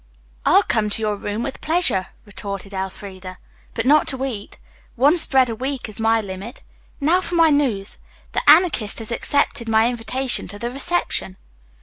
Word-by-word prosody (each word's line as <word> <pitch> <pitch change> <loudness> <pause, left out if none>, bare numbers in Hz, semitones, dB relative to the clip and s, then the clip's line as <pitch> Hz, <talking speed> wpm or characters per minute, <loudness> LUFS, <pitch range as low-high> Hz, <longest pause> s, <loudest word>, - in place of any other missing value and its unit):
"I'll - - +6
come 210 -1 0
to 215 - -3
your 210 -1 0
room 205 +3 -4
with 270 - -6
pleasure," 315 - +1 0.2
retorted 200 -1 -6
Elfreda, 190 -1 -7 0.4
"but 225 - -2
not 295 +3 +4
to 265 0 +1
eat. 220 -7 -6 0.4
One 280 +6 +4
spread 265 -6 +5
a 230 - -3
week 260 +2 -4
is 215 -1 -10
my 225 0 +2
limit. 200 +5 -8 0.4
Now 330 +6 +2
for 355 - -4
my 330 -2 +5
news. 245 -9 0 0.3
The - - 0
Anarchist 300 - +4
has 225 0 -4
accepted 235 -1 +1
my 220 +1 +3
invitation 245 +2 -2
to 205 - -7
the 235 +3 -4
reception." 275 - -1
230 Hz, 165 wpm, -21 LUFS, 205-275 Hz, 0.4 s, I'll